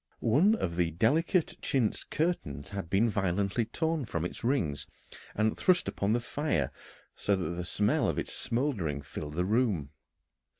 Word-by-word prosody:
One 160 - +4
of 85 - -3
the 85 -2 +2
delicate 155 - +2
chintz 125 -6 0
curtains 95 - -2
had 100 -4 -5
been 100 +6 +3
violently 100 +1 0
torn 160 +4 -1
from 85 -5 -2
its 90 - -6
rings 85 - 0 0.5
and 110 +1 +2
thrust 180 -1 +3
upon 100 +2 0
the 120 - +2
fire, 120 - -1 0.4
so 100 - +1
that 90 -4 -2
the 90 +1 -3
smell 105 +4 +1
of - - -1
its - - -3
smouldering 105 - -1
filled 75 +3 -7
the 90 +2 +1
room. 100 - +1
105 Hz, 160 wpm, -30 LUFS, 85-130 Hz, 0.5 s, One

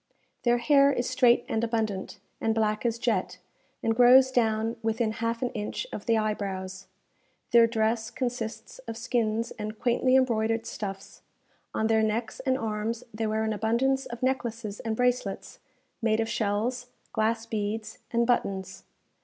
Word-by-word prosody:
Their 240 0 +3
hair 280 +3 +5
is 245 -2 -1
straight 240 -2 +4
and 220 - -1
abundant, 220 -4 -2 0.2
and 225 0 +1
black 215 +1 +1
as 230 0 -1
jet, 190 -6 -1 0.5
and 225 - +1
grows 255 +2 +7
down 225 -1 +1
within 225 0 0
half 230 +2 -2
an 245 - -1
inch 210 - -4
of - - -6
the 230 -1 +4
eyebrows. 195 -3 -3 0.6
Their 235 -1 +7
dress 220 0 0
consists 240 -3 -4
of 225 0 -5
skins 230 -1 -1
and 215 +1 -5
quaintly 255 +2 +2
embroidered 225 -3 +2
stuffs; 195 -3 -6 0.5
on 220 - +1
their 220 0 +3
necks 220 +1 -1
and 260 -1 +1
arms 225 0 -3
they 220 +1 -2
wear 220 +1 0
an 220 0 0
abundance 240 +6 +1
of 235 +1 -8
necklaces 235 -5 -2
and 225 -1 -2
bracelets, 250 -5 -1 0.4
made 220 -1 +2
of 225 - +1
shells, 225 +4 -1 0.3
glass 225 +1 0
beads, 215 0 -3
and 235 0 +2
buttons. 190 -6 -1
225 Hz, 155 wpm, -27 LUFS, 215-240 Hz, 0.6 s, grows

